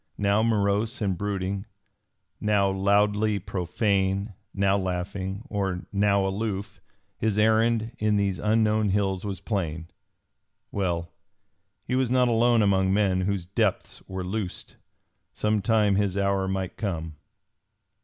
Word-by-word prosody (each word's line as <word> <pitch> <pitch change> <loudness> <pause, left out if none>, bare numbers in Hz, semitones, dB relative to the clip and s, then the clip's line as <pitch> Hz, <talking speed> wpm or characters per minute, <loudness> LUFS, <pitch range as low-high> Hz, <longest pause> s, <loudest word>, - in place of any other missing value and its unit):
Now 100 +1 +2
morose 110 +1 +1
and 100 -3 0
brooding, 100 +1 -3 0.7
now 100 -2 +2
loudly 105 +2 +2
profane, 100 +2 -1 0.2
now 100 0 +2
laughing 95 +2 -3
or 95 -6 -2
now 100 -1 +3
aloof, 100 0 -3 0.4
his 110 -2 0
errand 110 +1 +3
in 105 -1 +2
these 100 -2 0
unknown 110 -1 +2
hills 95 -1 0
was 95 -3 -4
plain. 85 -5 -3 0.8
Well, 85 -4 -2 0.7
he - - -4
was 130 -1 +2
not 125 0 +3
alone 115 0 +4
among 95 -1 +3
men 95 -2 +2
whose 95 -2 -1
depths 100 +1 -1
were 95 -1 -4
loosed. 95 0 -5 0.6
Some 105 -1 0
time 105 -2 +3
his 100 -2 0
hour 100 -1 +1
might 95 -1 -3
come. 80 -7 -4
100 Hz, 125 wpm, -26 LUFS, 95-105 Hz, 0.8 s, alone